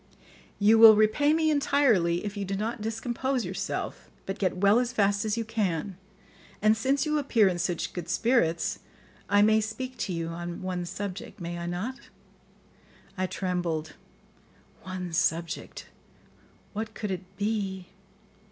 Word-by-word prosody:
"You 215 +2 +5
will 225 -1 +10
repay 215 +8 +3
me 315 0 +3
entirely 235 - +2
if 205 0 -4
you 205 - -3
do 195 0 -3
not 220 +3 -3
discompose 240 +3 -2
yourself, 185 +2 -4 0.2
but 195 +1 -5
get 185 -2 0
well 200 +4 +5
as 245 -1 -1
fast 205 -3 +1
as 215 +1 0
you 230 - -2
can; 200 -4 -2 0.6
and 215 +1 +4
since 270 +6 +1
you 305 -1 +1
appear 235 -7 +3
in 180 -2 -1
such 175 -1 -2
good 175 -2 -6
spirits, 185 -8 +1 0.5
I 205 +1 +5
may 220 +1 +4
speak 255 +4 -5
to 195 - -2
you 165 -1 -3
on 175 +1 -6
one 180 -1 -3
subject, 200 +2 -6
may 175 0 -5
I 170 - -4
not?" 195 +10 -3 1.2
I 185 -1 -1
trembled. 175 -5 -2 0.9
One 185 -1 -6
subject! 165 +1 -1 0.9
What 220 +1 -5
could 210 -2 -3
it 185 0 -7
be? 200 -3 -2
205 Hz, 150 wpm, -27 LUFS, 180-225 Hz, 1.2 s, will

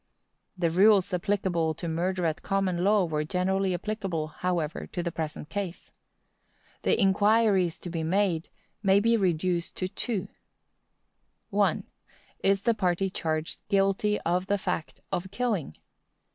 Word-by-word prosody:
The 170 -2 +1
rules 195 +1 +5
applicable 180 -4 0
to 170 - -5
murder 175 +2 -1
at 160 0 -1
common 190 -3 0
law 205 -1 +4
were 155 -2 -1
generally 190 +4 0
applicable, 185 -5 -3
however, 170 -1 -2
to 175 - -4
the 170 - -2
present 155 -1 -5
case. 185 0 -5 0.9
The - - +2
inquiries 200 -3 +3
to 175 - -8
be 165 -1 -2
made 175 0 +1 0.3
may 195 -1 +5
be 230 +3 +3
reduced 175 -3 0
to 185 - -1
two: 205 +1 -3 1.2
1. - - +2 0.6
Is 195 0 +2
the 235 - +3
party 190 -2 0
charged 160 +1 -2
guilty 195 +1 +2
of 180 +3 0
the 205 0 +2
fact 180 -4 -4
of 185 +2 -2
killing? 205 - -2
185 Hz, 135 wpm, -28 LUFS, 170-200 Hz, 1.2 s, rules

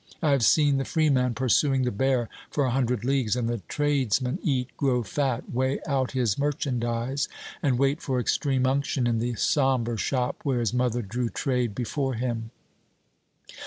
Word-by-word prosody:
I 155 - +2
have 140 -2 +3
seen 145 +6 +4
the 135 - 0
free 155 +1 +1
man 125 -3 +1
pursuing 130 +2 +2
the 125 - 0
bear 125 +2 +1 0.2
for 145 - 0
a 130 - 0
hundred 125 -3 0
leagues 130 -5 +1
and 120 -2 -1
the 120 -2 -2
tradesman 135 - 0
eat, 135 - -1
grow 125 -4 +1
fat, 130 +3 -2
weigh 130 +2 0
out 135 -4 0
his 120 -5 0
merchandise, 130 -2 -1 0.3
and 130 -4 +2
wait 140 +4 +1
for 130 -2 -1
extreme 130 +1 +1
unction 135 -1 0
in 115 -1 +1
the 120 +1 -1
sombre 130 -4 +1
shop 125 +3 -1
where 135 -4 0
his 115 -3 0
mother 125 -1 0
drew 120 +4 -2
trade 125 -6 -1
before 130 +3 -2
him. 115 -1 -3
130 Hz, 170 wpm, -26 LUFS, 120-135 Hz, 0.3 s, seen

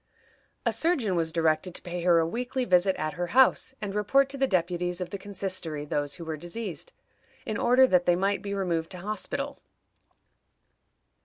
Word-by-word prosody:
A - - +2
surgeon 275 - +1
was 165 -1 0
directed 165 +2 +1
to - - -6
pay 175 0 -4
her 170 -1 +4
a 165 - +3
weekly 245 +7 -2
visit 185 -1 +3
at 155 0 -3
her 175 +2 -3
house, 260 0 +4
and 200 -2 -4
report 265 +7 +3
to 275 - -6
the 270 - +3
deputies 175 -2 0
of 180 - -5
the 200 - -3
Consistory 185 -6 -4
those 145 -1 -2
who 170 - -8
were 160 -1 -4
diseased, 195 - -6 0.5
in - - -3
order 255 +2 +5
that 180 -7 +2
they 175 - +5
might 195 +1 0
be 200 -1 -4
removed 170 -4 -1
to - - -7
hospital. 215 +9 -4
185 Hz, 180 wpm, -27 LUFS, 170-215 Hz, 0.5 s, order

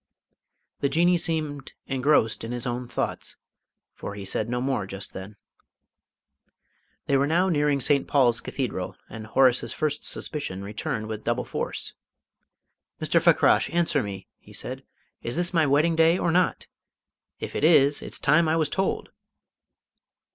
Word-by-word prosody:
The 140 - +1
Jinnee 175 +5 +3
seemed 155 -5 -3
engrossed 130 -5 +1
in 115 - -5
his 120 +1 -4
own 125 0 -3
thoughts, - - -4 0.6
for 100 - -7
he 100 -1 -7
said 105 +3 -2
no 125 0 -1
more 130 -6 -1
just 95 0 -7
then. 95 +2 -8 1.7
They 140 - +1
were 140 +1 +2
now 175 +5 +2
nearing 145 -3 +2
St. 140 +2 +2
Paul's 120 -4 +3
Cathedral, 115 -9 -4 0.2
and 110 -1 -8
Horace's 130 +1 +3
first 150 -1 -2
suspicion 100 -11 -3
returned 110 +1 -4
with 110 0 -6
double 120 +2 -1
force. - - -4 1.1
"Mr. - - +2
Fakrash, - - +4
answer 165 -4 +1
me," 100 -3 -7
he - - -17
said. - - -6 0.4
"Is 120 +1 -3
this 175 +1 -1
my 160 -3 +3
wedding 150 +4 +3
day 165 +2 +4
or 170 - 0
not? 180 +2 +1 0.7
If - - -6
it - - -2
is, 145 -3 +5
it's - - -6
time 160 +3 +3
I 160 - +2
was 160 -3 +1
told!" 190 +4 -1
140 Hz, 150 wpm, -25 LUFS, 115-160 Hz, 1.7 s, is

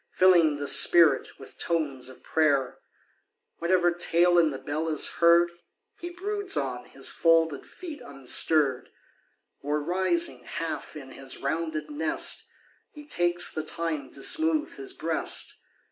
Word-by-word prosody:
Filling 170 -5 +4
the 145 - -4
spirit 165 +3 +4
with - - -15
tones 145 -7 -2
of 130 - -15
prayer 140 -5 +1 0.8
Whatever 175 0 +2
tale 175 0 +2
in 165 -2 +3
the 135 - -5
bell 155 +4 -3
is 155 -2 +3
heard, 170 0 +5 0.5
lie 345 - -5
broods 400 +3 -2
on 125 -3 -3
his 135 - -4
folded 165 -3 +2
feet 325 -5 -10
unstirr'd, 140 0 0 0.7
Oi, 145 - -7
rising 170 -4 0
half 165 +4 -6
in 135 -3 -10
his 135 -1 -8
rounded 155 +1 -3
nest. 155 +2 -2 0.4
He 295 -1 -13
takes 175 -8 +1
the 155 - -2
time 155 -3 -4
to 135 - -7
smooth 320 -1 +2
his 395 -1 -6
breast. - - -3
165 Hz, 135 wpm, -26 LUFS, 145-175 Hz, 0.8 s, heard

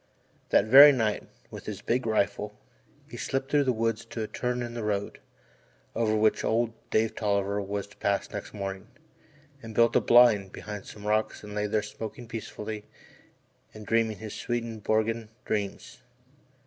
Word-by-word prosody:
That - - +4
very 140 +6 +10
night, 110 -6 -1 0.2
with - - -9
his - - -6
big 120 +1 0
rifle, 105 -1 0 0.5
he - - -9
slipped 135 0 -3
through 145 -1 +3
the 130 - +3
woods 115 -1 -1
to 115 - -5
a - - -4
turn 125 +1 -2
of 120 0 -6
the 120 -1 -4
road, 100 -1 -2 0.7
over 110 -2 +1
which 110 0 +2
old 115 0 +1 0.2
Dave 110 0 +1
Tolliver 100 -1 0
was 100 0 -3
to 105 - -20
pass 100 -1 0
next - - -6
morning, 95 -2 -5 0.7
and 110 -1 -9
built 115 0 +4
a - - +5
"blind" 115 -6 +5
behind 105 -2 -7
some 105 -1 -10
rocks 110 +1 0
and 105 0 -8
lay 105 0 -1
there 105 0 0
smoking 110 +2 -7
peacefully 110 -2 -6 0.9
and 105 -1 -9
dreaming 115 -1 +1
his 110 0 -7
Swedenborgian 115 -1 -1 0.2
dreams. 100 -2 -4
110 Hz, 160 wpm, -28 LUFS, 105-115 Hz, 0.9 s, very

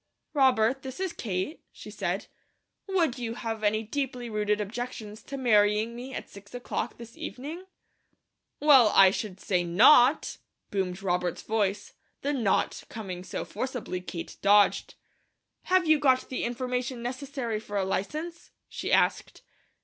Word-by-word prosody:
"Robert, 260 -3 +3
this 260 +3 -8
is 380 -3 -2
Kate," 190 - -4
she - - -11
said. - - -2 0.6
"Would 335 -10 +1
you 230 -1 -4
have 225 -2 -4
any 215 +1 +2
deeply 250 0 -4
rooted 210 0 0
objections 215 0 -5
to 275 - -7
marrying 215 -2 +3
me 250 +2 -7
at - - -6
six 200 +4 -13
o'clock 245 - -4
this 235 0 -11
evening?" 310 +8 -7 0.9
"Well, 270 -8 +7
I 190 -1 +8
should 200 -2 -5
say 180 -3 0
not!" 245 - +5 0.3
boomed 190 -1 -2
Robert's 180 -2 -1
voice, 205 -2 -1 0.3
the 285 +1 0
"not" 225 -8 0
coming 185 -5 -6
so - - -5
forcibly 235 -5 -4
Kate 170 -1 -7
dodged. 205 +1 +4 0.7
"Have 370 -1 +3
you 310 -1 +5
got 260 -3 +2
the 255 - -2
information 250 0 -3
necessary 255 -3 -3
for 205 -1 -5
a 195 - +1
license?" 310 - -4 0.2
she - - -5
asked. - - +1
230 Hz, 140 wpm, -28 LUFS, 205-265 Hz, 0.9 s, I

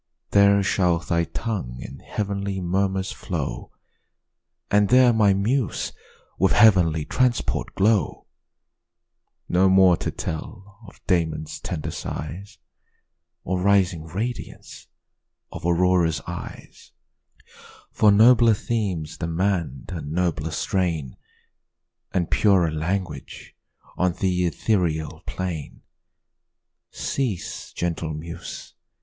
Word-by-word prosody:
There 100 0 +5
shall 90 -3 +2
thy 85 0 0
tongue 90 - -4
in 70 - -9
heav'nly 100 -1 -3
murmurs 95 +1 -1
flow, - - -5 1.0
And 105 -1 +4
there 125 0 +6
my 105 -3 +4
muse 115 +3 -1 0.5
with - - +3
heav'nly 90 -8 +5
transport 125 -2 0
glow: 105 +1 +1 1.2
No 95 +2 +3
more 95 -2 +6
to - - -3
tell 95 +5 -7
of - - -17
Damon's 80 -4 -1
tender 75 - -4
sighs, 85 +7 -6 0.9
Or 90 +1 -2
rising 95 -4 +2
radiance 110 +9 -6 0.6
of - - -8
Aurora's 85 -1 +2
eyes, - - -9 1.0
For 105 - +4
nobler 115 +1 +6
themes 95 -9 -3
demand 85 -4 -2
a 85 - -4
nobler 80 +1 -1
strain, 80 -4 -1 1.0
And 90 -3 -1
purer 95 -6 +3
language 80 -1 -4 0.4
on 90 -1 +2
th' - - -10
ethereal 90 -2 0
plain. 90 -5 -5 1.1
Cease, 120 -10 -3
gentle 85 -2 -3
muse! 80 +2 -8
90 Hz, 95 wpm, -24 LUFS, 80-100 Hz, 1.2 s, there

